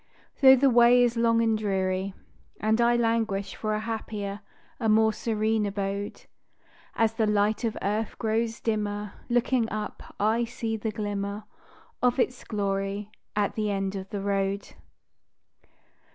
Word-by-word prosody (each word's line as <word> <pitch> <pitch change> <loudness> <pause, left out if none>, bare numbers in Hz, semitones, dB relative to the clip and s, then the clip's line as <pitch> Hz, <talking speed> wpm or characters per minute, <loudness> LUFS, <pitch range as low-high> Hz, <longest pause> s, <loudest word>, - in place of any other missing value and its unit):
Though 265 -1 +9
the 275 +2 +3
way 240 +1 +6
is 240 -1 +2
long 230 0 +3
and 225 -1 +2
dreary, 190 -2 -1 0.4
And 220 +2 +2
I 240 0 +4
languish 225 -4 0
for 215 -1 -2
a - - -1
happier, 210 -2 -4 0.4
a 225 -3 +1
more 220 0 +4
serene 220 -1 0
abode, 200 0 -4 0.7
As 225 -1 +2
the 225 -1 +1
light 210 +2 +1
of 225 -2 -1
earth 210 +2 -1
grows 225 +1 -1
dimmer, 210 -2 -2 0.2
Looking 240 -1 +2
up, 215 0 -5 0.2
I 220 +3 +2
see 230 -1 -3
the 220 +1 -3
glimmer 205 0 -3 0.6
Of 250 0 +3
its 250 0 0
glory 200 0 -2 0.2
at 205 -1 +1
the 215 -1 -1
end 195 -1 -1
of 190 0 -6
the 205 - -4
road. 195 0 -1
215 Hz, 145 wpm, -27 LUFS, 200-230 Hz, 0.7 s, Though